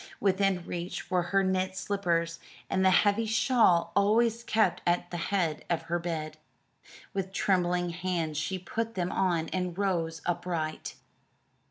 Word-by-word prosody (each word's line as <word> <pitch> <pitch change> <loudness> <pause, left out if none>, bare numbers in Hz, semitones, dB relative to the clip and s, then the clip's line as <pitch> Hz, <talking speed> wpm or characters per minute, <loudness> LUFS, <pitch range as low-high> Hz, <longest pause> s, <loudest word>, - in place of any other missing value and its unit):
Within 195 -2 +1
reach 175 +1 -5
were 180 -1 +3
her 195 0 +3
knit 185 0 0
slippers 170 -5 -1 0.3
and 190 - +2
the 190 - +6
heavy 205 +4 +3
shawl 220 -5 +3
always 225 +3 +3
kept 220 -6 +1
at 175 0 0
the 175 - -3
head 170 -6 0
of 170 -2 0
her 175 +1 -1
bed. 155 -3 -4 0.8
With 190 -1 -3
trembling 180 -2 +1
hands 170 -4 -2
she 190 +4 -2
put 225 +6 -4
them 180 -2 -1
on 170 -4 +1
and 180 -1 -3
rose 170 -5 -1
upright. 170 -3 -3
180 Hz, 145 wpm, -29 LUFS, 170-195 Hz, 0.8 s, the